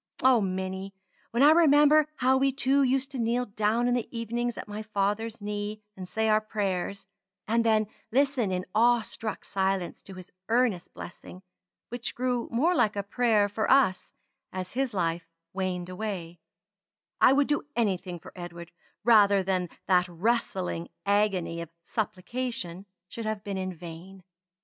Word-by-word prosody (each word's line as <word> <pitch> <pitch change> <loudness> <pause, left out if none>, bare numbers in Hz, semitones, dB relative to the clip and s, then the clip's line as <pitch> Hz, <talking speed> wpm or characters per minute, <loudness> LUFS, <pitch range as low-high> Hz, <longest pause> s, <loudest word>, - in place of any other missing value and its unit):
O, 255 -3 +6
Minnie! 190 0 -3 0.3
when 235 +4 +2
I 295 - +8
remember 305 -2 +6
how 260 0 +3
we 270 +1 +3
two 275 +1 +2
used 270 +1 +1
to 265 - -5
kneel 240 +2 +1
down 215 +3 0
in 245 - +2
the 245 -2 -1
evenings 235 +1 -3
at - - -6
my 210 +1 -5
father's 215 +1 -2
knee, 210 +1 -4
and 185 -1 -8
say 220 0 0
our 215 0 +4
prayers; 200 -2 -3 0.4
and 230 +2 +2
then 220 -1 +3 0.3
listen 265 -5 +2
in 185 0 -2
awe 240 +1 +4
struck 215 -1 -5
silence 190 -2 -1
to 195 - -11
his 185 -1 -11 0.2
earnest 230 -6 +1
blessing, 90 +1 -10 0.5
which 245 0 -4
grew 250 -1 -1
more 295 +10 +2
like 215 - +2
a 200 - -2
prayer 215 -1 +2
for 215 +2 -2
us 260 -9 +3 0.4
as 185 -1 -5
his 265 0 0
life 170 -2 -1 0.2
waned 185 -2 -2
away, 180 -3 -5 0.8
I - - +8
would 285 +1 +4
do 295 0 -1
anything 190 -6 -1
for - - -13
Edward 170 -1 -8 0.3
rather 205 -4 +5
than 185 -2 -1 0.2
that 180 -1 +3
wrestling 180 -2 -1 0.2
agony 200 -5 +1
of 170 - -7
supplication 200 -2 -4 0.2
should 225 +3 -6
have 215 -2 -3
been 200 -2 -3
in 185 0 -3
vain. 175 +2 -10
210 Hz, 160 wpm, -28 LUFS, 185-240 Hz, 0.8 s, I